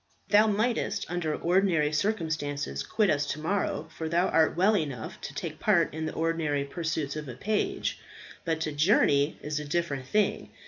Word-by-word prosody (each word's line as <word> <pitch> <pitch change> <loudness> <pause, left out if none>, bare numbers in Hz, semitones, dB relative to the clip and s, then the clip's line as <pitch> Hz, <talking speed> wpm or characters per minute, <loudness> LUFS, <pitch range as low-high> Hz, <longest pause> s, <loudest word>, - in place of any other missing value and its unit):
"Thou 210 +1 +6
mightst, 215 -1 0
under 170 -3 -1
ordinary 170 -4 +2
circumstances, 150 - -1
quit 205 - +1
us 145 -1 0
to 155 - -3
morrow, 160 -1 -1
for 160 -1 -4
thou 175 +3 +2
art 160 0 +3
well 200 +4 +4
enough 140 - -3
to - - -6
take - - -5
part - - +3
in 160 0 -3
the - - -4
ordinary 160 -3 0
pursuits 155 -2 -3
of 150 -3 -5
a 120 - -7
page; 210 - -1 0.4
but 165 -2 -1
to 155 - -1
journey 145 -2 +3
is 150 0 -2
a - - -5
different 145 -4 -2
thing. 210 +6 +1
160 Hz, 175 wpm, -28 LUFS, 145-185 Hz, 0.4 s, Thou